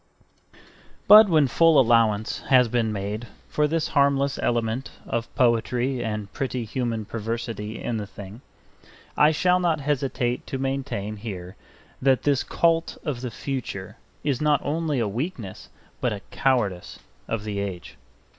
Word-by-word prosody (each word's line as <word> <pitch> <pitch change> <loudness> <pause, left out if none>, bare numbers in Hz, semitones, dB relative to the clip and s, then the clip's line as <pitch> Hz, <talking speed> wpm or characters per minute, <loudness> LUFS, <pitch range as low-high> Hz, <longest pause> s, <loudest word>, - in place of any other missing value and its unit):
But 210 0 +9
when 155 -4 +4
full 165 +4 +5
allowance 115 -3 +3
has 130 -3 +5
been 115 -1 0
made 105 +3 -4 0.2
for 150 0 +1
this 160 +1 -1
harmless 140 0 +2
element 120 +2 -1 0.2
of 115 0 -3
poetry 120 +1 +1
and 105 -3 -4
pretty 130 -3 -2
human 115 -1 -2
perversity 115 -1 -4
in 115 - -2
the 105 -1 -4
thing, 100 +4 -10 0.7
I 150 - +6
shall 180 +3 +2
not 170 -3 +1
hesitate 135 -3 -1
to 135 - -3
maintain 135 -6 -3
here 95 -4 -7 0.5
that 130 -1 +3
this 140 -3 +2
cult 165 -1 +1
of 140 -7 -3
the 125 - -3
future 115 -6 -5 0.3
is 140 -3 0
not 150 -1 +3
only 155 -1 -1
a 115 -3 +1
weakness 115 - -5 0.3
but - - 0
a 100 - -6
cowardice 110 -10 0 0.3
of 115 -2 -2
the 105 -2 -3
age. 95 -3 -5
120 Hz, 145 wpm, -24 LUFS, 110-140 Hz, 0.7 s, But